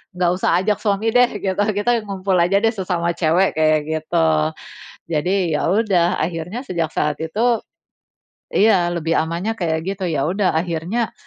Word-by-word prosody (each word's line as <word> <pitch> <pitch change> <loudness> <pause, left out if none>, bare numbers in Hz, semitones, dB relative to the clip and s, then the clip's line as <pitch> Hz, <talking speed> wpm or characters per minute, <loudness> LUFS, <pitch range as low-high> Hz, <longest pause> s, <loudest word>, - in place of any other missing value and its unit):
nggak 180 -1 +1
usah 175 -2 +1
ajak 210 +2 +1
suami 205 +1 0
deh 245 0 +5
gitu, 190 0 -1
kita 235 +3 +1
ngumpul 195 -1 -1
aja 180 +4 +3
deh 225 - +4
sesama 180 -4 -1
cewek, 170 +3 +2
kayak 155 -1 +3
gitu. 155 - 0 0.8
Jadi, 175 +2 0
ya 150 - 0
udah, 190 -4 +2
akhirnya 170 +7 -3
sejak 170 -6 -2
saat 150 -1 0
itu 225 +8 0 0.9
iya, 190 -5 +4
lebih 165 -1 -1
amannya 170 +7 -2
kayak 160 -3 -1
gitu. 195 -1 -6
Ya 140 -4 0
udah 190 +2 +1
akhirnya, 175 +7 -2
180 Hz, 155 wpm, -20 LUFS, 165-200 Hz, 0.9 s, deh